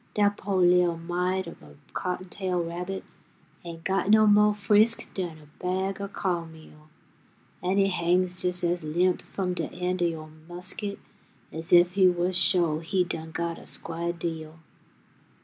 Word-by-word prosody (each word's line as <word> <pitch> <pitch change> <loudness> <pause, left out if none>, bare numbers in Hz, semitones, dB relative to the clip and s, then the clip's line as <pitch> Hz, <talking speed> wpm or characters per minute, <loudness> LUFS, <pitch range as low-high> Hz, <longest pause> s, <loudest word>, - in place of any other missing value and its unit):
Dat 205 -1 +3
po' 200 0 -3
li'l' 180 -2 +4
mite 180 +2 -1
ob 170 - -10
a 75 -1 -15 0.2
cottontail 180 0 -2
rabbit 180 +3 -5 0.6
Ain't 165 -1 -8
got 190 +1 0
no 215 0 +6
mo' 210 0 +6
frisk 210 +2 +3
dan 175 -4 -4
a 150 -1 -19
bag 190 +2 -1
o' 200 - -3
co'n 175 -4 -2
meal, 155 -1 -16 0.7
An' 185 +2 0
he 195 -1 +4
hangs 180 0 +1
jes' 180 0 -1
as 175 0 0
limp 175 +4 +1
f'um 185 -2 -3
de - - -3
end 180 0 -2
o' - - +4
yo' 155 -2 -6 0.2
musket 185 +3 -5 0.5
As 160 +1 -2
ef 175 0 +7
he 190 0 +5
wus 180 +1 +1
sho' 175 -4 +3
he 180 +3 0
done 165 -2 -4
got 170 +1 -3
a - - -13
squah 170 +1 -2
deal. 160 -2 -5
180 Hz, 165 wpm, -27 LUFS, 170-190 Hz, 0.7 s, ef